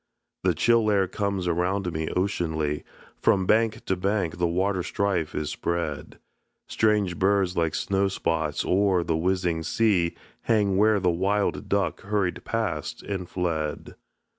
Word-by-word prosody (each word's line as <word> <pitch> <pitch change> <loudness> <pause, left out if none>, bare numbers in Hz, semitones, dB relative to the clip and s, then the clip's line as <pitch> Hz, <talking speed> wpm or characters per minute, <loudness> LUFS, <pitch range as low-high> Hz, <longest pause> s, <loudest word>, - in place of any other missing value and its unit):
The - - +2
chill 115 -2 +3
air 100 -2 +3
comes 100 -1 -2
around 90 +1 0
me 80 0 -2
oceanly, 80 -6 -1 0.4
From 95 -1 +3
bank 110 +2 +2
to 95 - +1
bank 95 -2 -1
the 85 - +2
waterstrife 95 -1 -1
is 75 0 -2
spread; 85 -4 -3 0.5
Strange 105 -6 +1
birds 95 -2 +2
like 80 -2 +1
snowspots 90 -6 0
oer 95 -2 +2
the 80 - 0
whizzing 90 -1 0
sea 90 -1 +1 0.3
Hang 105 -4 +2
where 105 +1 +4
the 90 -2 +2
wild 100 +4 0
duck 100 -1 0
hurried 100 -3 -1
past 105 -10 -3
and 95 -3 -4
fled. 80 -4 -3
95 Hz, 135 wpm, -26 LUFS, 85-100 Hz, 0.5 s, where